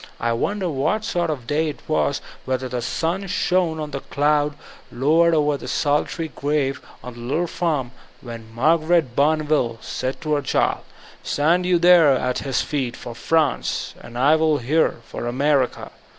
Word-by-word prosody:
I 115 - 0
wonder 195 - -1
what 165 +9 -1
sort 175 -4 -1
of 140 -6 -4
day 155 +4 0
it 145 - -8
was; 150 -2 0 0.2
whether 130 0 -2
the 125 -1 -3
sun 170 +10 -2
shone 180 -3 +1
or 155 -1 -4
the 140 -2 -5
clouds 145 +1 +1 0.4
low 145 +7 +2
ered 170 -1 +5
over 150 -1 +2
the - - -9
solitary 150 +2 0
grave 140 0 -1 0.2
on 125 - -8
the 120 - -12
little 135 +9 -1
farm, 155 -8 -2 0.3
when 115 -2 -9
Mar 155 +9 +3
garet 155 -6 +1
Bonneville 150 -5 +1
said 130 +3 -4
to 155 -2 -1
her 145 - +1
child, 135 - 0 0.4
"Stand 170 +5 +1
you 180 -1 +4
there 170 -4 +6
at 125 0 -1
his 135 -2 -1
feet, 130 -5 -3
for 120 - -8
France; 155 +3 0
and 120 0 -10
I 140 +5 +5
will 155 -1 +2
here, 145 0 +1
for 120 - -6
America." 135 +1 0
150 Hz, 175 wpm, -22 LUFS, 130-160 Hz, 0.4 s, there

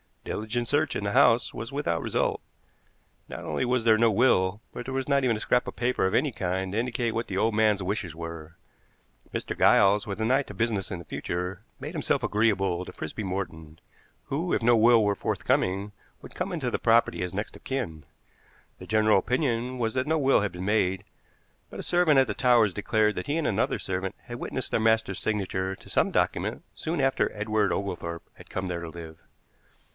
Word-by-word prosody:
Diligent 115 +3 -3
search 145 +1 +1
in - - -2
the 100 - -1
house 115 +2 +4
was 115 +3 -6
without 135 - -1
result. - - -1 0.9
Not - - -7
only - - -1
was 125 -1 +1
there 110 -1 +5
no 115 +1 +4
will, 105 -3 +2
but 125 - -7
there 130 - -5
was 135 -1 -2
not 140 -1 +3
even 120 -3 +2
a - - -4
scrap 125 +3 +1
of - - -6
paper 120 -5 +1
of 95 - -1
any 150 - +2
kind 95 -3 -2
to 105 - 0
indicate 120 0 -1
what 115 +1 -2
the 95 - -3
old 110 +3 +2
man's 105 -2 +2
wishes 90 -4 -3
were. 85 -1 -8 0.8
Mr. - - -3
Giles, 100 +1 +5
with 100 0 -4
an 110 +3 +1
eye 135 +2 +3
to 105 - -10
business 105 -2 -1
in 90 - -5
the 85 - -10
future, 90 +3 -4 0.2
made - - -6
himself - - 0
agreeable 95 -4 +1
to - - -8
Frisby 110 - -6
Morton, 85 -5 -5 0.5
who, 165 +6 -2
if - - 0
no 120 +1 +5
will 115 0 +5
were 100 -1 +1
forthcoming, 100 +2 0 0.3
would - - -12
come - - -3
into - - -2
the - - -1
property 115 -7 +3
as 90 0 -3
next 105 +3 -4
of - - -15
kin. 110 - -4 0.8
The - - -10
general 110 -2 +4
opinion 125 +1 -1
was 115 -2 -1
that 130 +2 0
no 160 +1 +2
will 135 -5 +3
had 105 -2 -1
been 90 +1 -6
made, 95 -2 +1 0.7
but - - -9
a - - -4
servant 175 -5 +4
at 135 - +4
the - - -2
Towers 120 -6 +4
declared 105 +1 +1
that - - -5
he 145 +3 0
and 165 - 0
another 105 +2 +1
servant 95 +1 -3
had 120 -1 -8
witnessed 130 - -3
their - - +2
master's 110 -3 +2
signature 95 -3 -2
to - - -16
some - - +2
document - - -1
soon 160 -2 -3
after 135 0 +1
Edward 105 -1 0
Oglethorpe 85 -4 -4
had - - -15
come 95 - -3
there 85 -1 -3
to 85 - -6
live. 80 -1 -10
110 Hz, 210 wpm, -27 LUFS, 95-120 Hz, 0.9 s, there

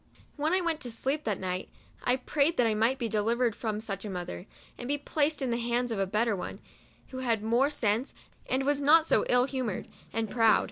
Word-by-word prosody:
When 305 +2 0
I 370 +1 +3
went 335 -3 0
to 245 -5 -6
sleep 270 +6 -2
that 210 -3 -1
night, 185 0 -3 0.3
I 250 - +3
prayed 285 +5 +1
that 245 - +4
I 225 - +2
might 225 +5 +2
be 240 -3 -1
delivered 225 +2 +1
from 215 -2 -3
such 195 -3 -4
a 210 - -5
mother, 180 +1 -5 0.3
and 245 - -7
be 290 +2 +1
placed 295 0 0
in 255 - 0
the 235 - 0
hands 240 +1 0
of 220 - -2
a 195 - +1
better 215 +2 +1
one, 180 - -6 0.5
who 260 - -6
had 230 -4 0
more 240 +5 +3
sense, 235 -3 0 0.4
and 260 +1 +1
who - - -4
was 285 0 +1
not 310 +3 +6
so - - +2
ill 250 0 +4
humored 255 -7 -3 0.2
and 225 0 -1
proud. 225 0 +4
240 Hz, 230 wpm, -29 LUFS, 215-275 Hz, 0.5 s, not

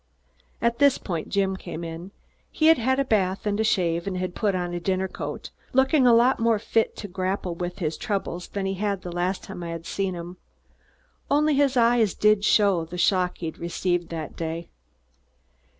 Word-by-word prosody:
At 235 +1 +1
this 280 -2 +5
point, 170 -5 -4
Jim 195 -1 +1
came 175 -3 -7
in. 165 +2 -7 0.4
He 310 - -1
had 325 - +6
had 260 +3 +1
a 275 - +2
bath 195 -5 0
and 205 0 0
a - - +3
shave 170 -4 +1
and 185 -2 -2
had 180 -1 -3
put 205 -1 0
on 175 -1 -2
a 175 - -2
dinner 190 +2 0
coat, - - -6 0.2
looking 265 +1 +4
a - - +7
lot 245 +3 +4
more 230 -1 +3
fit 225 +1 0
to 205 - -7
grapple 185 -1 -2
with 175 +1 -5
his 155 -2 -2
troubles 190 -4 -3
than 200 -1 -4
he 195 - -1
had 200 -1 -2
the 175 - -6
last 180 +2 -2
time - - -8
I 170 - -5
had 165 0 -6
seen 195 -2 -2
him. 175 +1 -8 0.9
Only 300 +1 +3
in - - +1
his 275 -2 +2
eyes 235 -4 +3
did 210 0 +4
he - - -16
show 200 -4 +3
the 170 +2 -8
shock 180 0 +2
he'd 165 -2 -6
received 175 0 -1
that 160 -3 -6
day. 165 +1 -4
190 Hz, 205 wpm, -25 LUFS, 175-220 Hz, 0.9 s, a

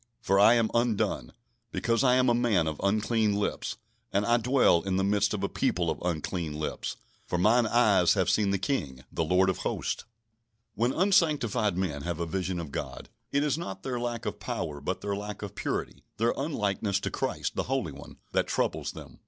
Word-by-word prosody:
for 100 -4 +2
I 110 +4 +7
am 115 -2 +2
undone; 115 - 0 0.4
because 115 +2 +1
I 125 -1 +5
am 130 0 +3
a 120 - +4
man 115 -8 +2
of 80 -1 -3
unclean 110 +1 +2
lips, 100 +1 -2 0.3
and 100 +1 +1
I 120 +2 +4
dwell 120 -7 +4
in 95 +1 -2
the 95 - +1
midst 100 +1 +2
of - - -2
a - - +2
people - - 0
of - - -6
unclean 85 -2 -2
lips: 75 0 -4 0.3
for 90 - -1
mine 110 +6 +4
eyes 105 -7 +4
have 95 -3 +1
seen 105 -2 +2
the 100 - +2
King, 75 - -2
the 85 - -1
Lord 90 +4 +3
of 95 - 0
Hosts." - - -2 0.7
When 120 +4 +1
unsanctified 145 - +2
men 80 -7 -2
have 85 +1 -3
a 85 - -1
vision 90 +1 -2
of 80 -4 -6
God, - - -6 0.2
it 140 +1 +2
is 150 +1 0
not 95 - -6
their 125 -2 -2
lack 120 -1 -3
of - - -4
power, 75 -2 -4
but 95 +6 -3
their 100 -1 -2
lack 105 0 -6
of - - -6
purity, - - -3
their 115 +2 +2
unlikeness 105 -8 -1
to - - -3
Christ, - - -2
the - - -2
Holy 130 - 0
One, 70 +1 -12
that - - +1
troubles - - -1
them. - - -11
105 Hz, 200 wpm, -28 LUFS, 90-120 Hz, 0.7 s, I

